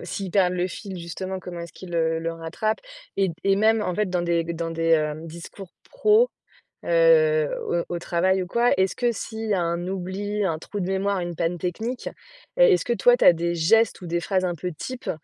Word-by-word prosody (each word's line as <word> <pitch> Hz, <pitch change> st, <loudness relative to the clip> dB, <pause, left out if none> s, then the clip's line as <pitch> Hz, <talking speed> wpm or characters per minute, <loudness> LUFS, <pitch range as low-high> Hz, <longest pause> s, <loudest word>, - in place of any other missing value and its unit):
s'ils 195 Hz, -2 st, -5 dB
perdent 180 Hz, -3 st, +3 dB
le 180 Hz, 0 st, 0 dB
fil, 195 Hz, 0 st, -7 dB
justement, 185 Hz, +3 st, -5 dB
comment 175 Hz, -1 st, -7 dB
est-ce 170 Hz, -2 st, -8 dB
qu'ils, 180 Hz, -2 st, -9 dB
heu, 160 Hz, -1 st, +1 dB
le 165 Hz, 0 st, -3 dB
rattrapent 165 Hz, +7 st, -3 dB, 0.4 s
et 190 Hz, -2 st, +2 dB
et 195 Hz, 0 st, +4 dB
même, 220 Hz, +2 st, +3 dB
en 180 Hz, -, -2 dB
fait, 210 Hz, +1 st, 0 dB
dans 180 Hz, -1 st, -1 dB
des 170 Hz, -1 st, +1 dB
dans 165 Hz, 0 st, -4 dB
des, 165 Hz, 0 st, -1 dB
hem, 155 Hz, 0 st, +1 dB
discours 170 Hz, +3 st, -10 dB, 0.2 s
pro, 480 Hz, 0 st, +4 dB, 0.5 s
heu, 485 Hz, -1 st, +4 dB, 0.2 s
au 170 Hz, -, 0 dB
au 175 Hz, -, -2 dB
travail 185 Hz, +2 st, +1 dB
ou -, -, -5 dB
quoi, 235 Hz, +6 st, +2 dB
est-ce 190 Hz, 0 st, +1 dB
que 240 Hz, -1 st, +1 dB
s'il 220 Hz, 0 st, -5 dB
y 205 Hz, -, +3 dB
a 180 Hz, -, +1 dB
un 170 Hz, +1 st, -2 dB
oubli, 195 Hz, +3 st, -3 dB
un 165 Hz, -4 st, 0 dB
trou 205 Hz, +5 st, -6 dB
de 180 Hz, -, -2 dB
mémoire, 195 Hz, 0 st, 0 dB
une 175 Hz, -1 st, -4 dB
panne 170 Hz, +1 st, -1 dB
technique, 220 Hz, +9 st, -3 dB, 0.5 s
est -, -, +7 dB
est-ce -, -, 0 dB
que 240 Hz, -, -1 dB
toi, 245 Hz, +1 st, +5 dB
tu -, -, +1 dB
as -, -, +9 dB
des 170 Hz, +1 st, -2 dB
gestes 220 Hz, +7 st, +3 dB
ou 175 Hz, -, -6 dB
des 170 Hz, +1 st, -1 dB
phrases 185 Hz, +1 st, 0 dB
un 175 Hz, -1 st, -1 dB
peu 180 Hz, +3 st, -4 dB
types 250 Hz, -, -6 dB
185 Hz, 225 wpm, -24 LUFS, 170-215 Hz, 0.5 s, as